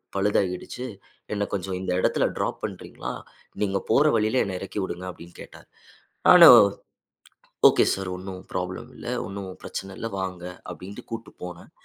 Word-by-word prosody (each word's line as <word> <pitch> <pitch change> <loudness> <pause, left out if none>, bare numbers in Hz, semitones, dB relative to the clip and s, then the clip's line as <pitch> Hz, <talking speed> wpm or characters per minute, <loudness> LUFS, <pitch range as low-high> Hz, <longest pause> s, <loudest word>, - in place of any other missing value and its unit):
பழுதாகிடுச்சு, 100 +4 -1 0.5
என்ன 105 0 0
கொஞ்சம் 95 -1 -2
இந்த 90 - -2
இடத்துல - - +2
டிராப் - - -2
பண்றீங்களா? - - -6 0.5
நீங்க 100 -1 +1
போற 140 +7 +5
வழியில 110 +4 +2
என்ன 95 -2 -4
இறக்கி 95 +2 -5
விடுங்க", 90 0 -5
அப்டின்னு 85 0 -14
கேட்டாரு. - - -13 0.6
நானும், - - +11 1.1
"ஓகே - - +3
சார், 95 -1 -4
ஒண்ணும் 95 0 -8
ப்ராப்ளம் 90 0 -4
இல்ல. - - -10 0.2
ஒண்ணும் 100 -1 -6
பிரச்சன 95 0 -6
இல்ல 115 - -4
வாங்க", 90 -2 -4 0.3
அப்டின்ட்டு 90 +5 -10
கூட்டு 115 0 -6
போனேன். 90 -1 -9
95 Hz, 140 wpm, -25 LUFS, 90-100 Hz, 1.1 s, நானும்